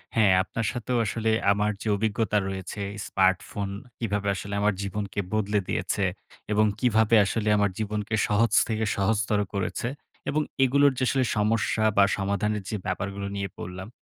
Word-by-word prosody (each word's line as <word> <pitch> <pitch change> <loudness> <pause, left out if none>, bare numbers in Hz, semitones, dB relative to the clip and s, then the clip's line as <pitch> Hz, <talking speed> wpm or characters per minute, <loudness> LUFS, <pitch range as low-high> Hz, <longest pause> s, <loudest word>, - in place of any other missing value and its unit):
হ্যাঁ, 105 -4 +5
আপনার 115 +4 -4
সাথেও 120 +1 -2
আসলে 110 +1 -1 0.2
আমার 105 +1 +1
যে - - -4
অভিজ্ঞতা 105 0 0
রয়েছে, 95 +1 -5 0.3
স্মার্টফোন 95 +1 +1 0.3
কিভাবে 105 -3 -1
আসলে 100 +1 -6
আমার 105 0 +3
জীবনকে 100 0 -4
বদলে 105 -1 +1
দিয়েছে 100 - -1 0.5
এবং 105 +1 +4
কীভাবে 110 -2 +3
আসলে 105 +1 -1
আমার 100 -1 +2
জীবনকে 105 0 -2
সহজ 115 +1 +2 0.2
থেকে 110 -1 -1
সহজতর 105 +1 +1
করেছে 100 +4 -2 0.4
এবং 150 +2 +1 0.2
এগুলোর 140 +2 +4
যে - - 0
আসলে 135 -1 +2
সমস্যা 110 +1 +1
বা 100 - +7
সমাধানের 100 +1 -1
যে - - -2
ব্যাপারগুলো 100 +2 -3
নিয়ে 100 -1 -3
বললাম, 90 +2 -6
105 Hz, 150 wpm, -26 LUFS, 100-110 Hz, 0.5 s, বা